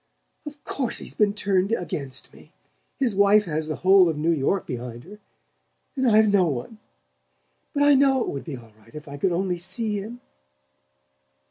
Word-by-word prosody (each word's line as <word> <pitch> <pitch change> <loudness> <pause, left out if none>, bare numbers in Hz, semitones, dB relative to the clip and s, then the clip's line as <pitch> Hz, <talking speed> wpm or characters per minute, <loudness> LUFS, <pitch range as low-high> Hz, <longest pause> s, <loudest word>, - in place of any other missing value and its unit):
"Of 290 -1 -10
course 260 -4 -3
he's - - -8
been 205 -1 +1
turned 195 -1 0
against 140 - -5
me. - - -18 0.5
His 250 -7 0
wife 200 +1 +4
has 155 -2 -3
the 155 - -3
whole 190 -2 +6
of 160 - -3
New 160 +3 +1
York 165 +5 0
behind 120 -3 -7
her, 205 +5 -13 0.8
and 260 -2 +2
I've 215 0 +5
no 195 -3 +3
one; 145 - -5 0.9
but 285 - +1
I 290 0 +6
know 270 -1 +4
it - - -2
would 140 - -5
be 150 -5 -7
all 115 -2 -15
right 115 +4 -20
if 150 -1 -9
I 140 0 -8
could 185 +5 0
only 180 0 -1
see 205 +4 -2
him." 225 +5 -8
190 Hz, 180 wpm, -24 LUFS, 150-215 Hz, 0.9 s, whole